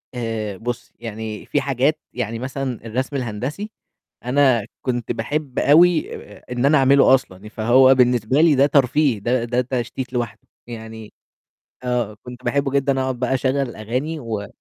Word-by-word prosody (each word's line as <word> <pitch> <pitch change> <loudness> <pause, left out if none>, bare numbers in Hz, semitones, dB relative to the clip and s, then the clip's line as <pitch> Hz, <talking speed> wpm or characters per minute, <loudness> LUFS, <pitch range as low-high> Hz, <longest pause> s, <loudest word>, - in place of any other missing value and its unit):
آآ، 110 -4 -3
بُصّي 120 +2 -5
يعني 110 -2 -6
في 145 - 0
حاجات 140 +3 +1
يعني 115 -2 -3
مثلًا 130 -2 -4
الرسم 130 +5 -3
الهندسي، 130 - -4 0.5
أنا 125 -4 +3 0.2
كنت 120 -3 -2
باحب 140 +3 -3
أوي 165 +3 +4
آآ - - -12
آآ - - -1
إن 125 +1 0
أنا 150 +2 +5
أعمله 135 0 +5
أصلًا 100 -7 -6
ي - - -8
فهو 125 +5 +5
بالنسبة 125 +1 +3
لي 160 -3 +5
ده 135 +1 +5
ترفيه 140 -3 +2
ده 120 +4 0
ده 120 +1 0
تشتيت 125 +1 -4
لوحده، 115 -3 -4 0.2
يعني 110 -2 -9 0.7
آه، 120 -4 -1
كنت 125 0 -10
باحبّه 140 +3 0
جدًا 140 -1 +1
أقعُد 130 -2 -2
بقى 125 +1 0
أشغّل 130 +1 0
الأغاني 135 +4 -3
و 110 -5 -4
125 Hz, 160 wpm, -21 LUFS, 115-135 Hz, 0.7 s, أنا